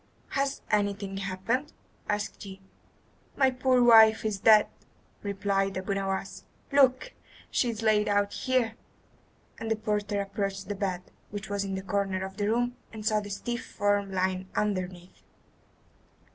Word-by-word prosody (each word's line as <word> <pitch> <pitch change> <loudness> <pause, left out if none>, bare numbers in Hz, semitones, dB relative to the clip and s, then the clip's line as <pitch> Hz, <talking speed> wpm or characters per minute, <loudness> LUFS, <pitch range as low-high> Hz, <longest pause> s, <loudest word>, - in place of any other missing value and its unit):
"Has 275 0 -1
anything 200 -1 0
happened?" 195 - -2 0.4
asked 205 0 -2
he. 190 -1 -9 0.8
"My 265 -2 +4
poor 255 -1 +3
wife 220 -2 +7
is 210 -2 -1
dead," 215 0 +7 0.6
replied 195 -1 -1
Abu 190 +2 -2
Nowas. 195 0 -3 0.3
"Look! 275 - +3 0.4
she 245 - +1
is 225 -1 -4
laid 215 -1 +3
out 205 0 +1
here." 255 -3 0 0.9
And 225 - -4
the 225 - +2
porter 210 -1 -1
approached 195 -1 -3
the - - 0
bed, 190 -3 -2 0.3
which 205 -1 -6
was 200 0 -1
in 195 -1 -3
a 190 - -5
corner 195 -1 -1
of 190 0 -9
the 205 0 0
room, 245 +2 0
and 215 -1 -8
saw 215 0 +3
the 205 -1 -7
stiff 235 +4 -4
form 205 -1 0
lying 185 0 -1
underneath. 185 -3 -3
205 Hz, 145 wpm, -28 LUFS, 195-225 Hz, 0.9 s, wife